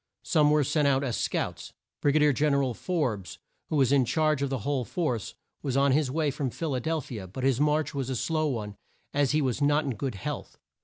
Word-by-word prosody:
Some 150 -4 +3
were 150 0 +4
sent 150 +2 +2
out 135 0 +2
as 125 -4 -1
scouts. - - -3 0.3
Brig 145 0 +2
a - - +5
dier 150 -1 +4
Gen 145 +1 +2
er 140 - +2
al 130 -2 -1
Forbes, 120 - -2 0.3
who - - -1
was 135 -3 +3
in 140 -2 +5
charge 155 +2 +1
of 140 - 0
the 135 - -1
whole 140 -3 0
force, 125 - -2 0.3
was 135 -2 -1
on 140 0 +4
his 145 0 +2
way 150 +1 0
from 135 -1 -2
Phil 155 +4 -3
a 130 - 0
del 160 +4 -1
phi 120 -3 -8
a, 95 - -8
but 125 +8 -7
his 135 0 +2
march 150 +1 +1
was 135 -2 -3
a 130 - -1
slow 155 +5 0
one 105 -7 -3 0.4
as 145 -1 +2
he 155 -1 +2
was 130 +1 -1
not 145 +2 +3
in 135 - -1
good 130 0 -4
health. 95 - -6
140 Hz, 250 wpm, -28 LUFS, 130-150 Hz, 0.4 s, a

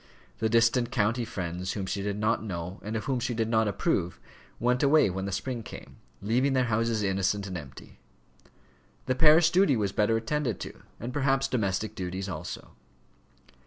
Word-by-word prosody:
The 110 - +1
distant 115 +2 +3
county 120 0 +1
friends 90 -2 -4
whom 100 -3 -3
she 100 +1 -3
did 100 0 -2
not 105 +1 +1
know 90 -2 -5
and 110 +2 -4
of 110 - -2
whom 130 -2 -1
she 120 0 -2
did 110 -1 0
not 110 -1 +2
approve 90 -3 -1 0.4
went 125 +1 +2
away 145 -7 +4
when 95 +1 -3
the 100 - -3
spring 120 +4 -3
came, - - -11 0.3
leaving 125 +6 +2
their 130 -1 +3
houses 115 -1 0
innocent 95 +1 0
and 95 -2 -6
empty. 70 -6 -10 1.1
The 130 - +1
parish 160 +4 +6
duty 180 -8 +4
was 100 -3 0
better 105 +3 +2
attended 120 -2 -1
to, - - -8 0.2
and 120 +3 -5
perhaps 135 -1 +2
domestic 110 -5 -1
duties 95 +1 -4
also. 95 - -6
110 Hz, 175 wpm, -28 LUFS, 95-125 Hz, 1.1 s, parish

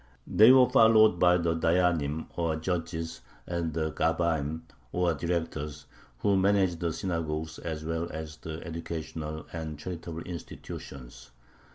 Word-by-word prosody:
They 110 +4 +7
were 130 -1 +7
followed 110 -6 +6
by 90 0 +5
the 85 -1 +1
dayyanim, 80 -3 +1
or 85 -2 0
judges, 80 0 -3 0.2
and 85 -2 -2
the 80 0 -1
gabbaim, 80 -1 0 0.3
or 90 -1 +1
directors, 75 -3 -3 0.3
who 100 +9 +2
managed 95 -3 +2
the 85 -1 -1
synagogues 80 -2 -3
as 80 -2 -5
well 80 +1 -2
as 80 0 -7
the 80 0 -7
educational 80 -1 -5
and 80 -2 -5
charitable 85 0 -6
institutions. 70 -6 -9
80 Hz, 130 wpm, -29 LUFS, 80-90 Hz, 0.3 s, They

